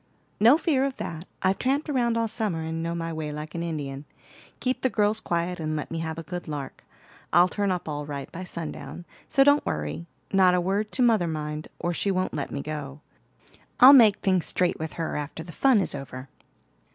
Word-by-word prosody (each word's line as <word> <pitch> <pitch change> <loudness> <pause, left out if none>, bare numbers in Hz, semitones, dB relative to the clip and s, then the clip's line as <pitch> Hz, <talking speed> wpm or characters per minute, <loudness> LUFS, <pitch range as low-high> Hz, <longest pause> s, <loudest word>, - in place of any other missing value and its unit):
"No 235 +7 +7
fear 305 -6 +1
of 275 -1 -2
that; 165 +1 -6 0.2
I've 190 +1 +2
tramped 275 +4 0
round 240 -5 +1
all 230 0 +1
summer, 210 -7 -2
and 160 0 -3
know 170 +1 -2
my 165 -1 -3
way 155 -1 -4
like 150 +1 -7
an 170 - -3
Indian. 145 -4 -4 0.5
Keep 255 0 -1
the 260 - +2
girls 215 -1 +1
quiet, 175 -2 -2
and 155 -1 -2
let 150 - -4
me 165 - -3
have 160 0 -4
a 165 - -5
good 175 +2 -6
lark. 145 -3 -6 0.5
I'll 175 +2 +6
turn 200 +1 -1
up 180 -3 -2
all 145 -1 -4
right 140 -2 -6
by 185 - -6
sundown; 170 0 -7 0.2
so 275 - +5
don't 285 +1 +5
worry. 75 +2 -4 0.3
Not 185 -2 +5
a - - +2
word 200 +4 -1
to 255 - +2
mother, 220 -7 +3
mind, 150 -1 -4
or 175 - -2
she 200 - -1
won't 185 -1 0
let 145 - -3
me 140 - -4
go. 145 -2 -6 0.8
I'll 260 +3 +10
make 220 -7 +7
things 185 -3 +1
straight 180 -1 0
with 160 -1 -4
her 165 -1 -3
after 150 +2 -5
the 170 - -10
fun 260 - +4
is - - -2
over." 135 -1 -7
170 Hz, 210 wpm, -26 LUFS, 155-210 Hz, 0.8 s, I'll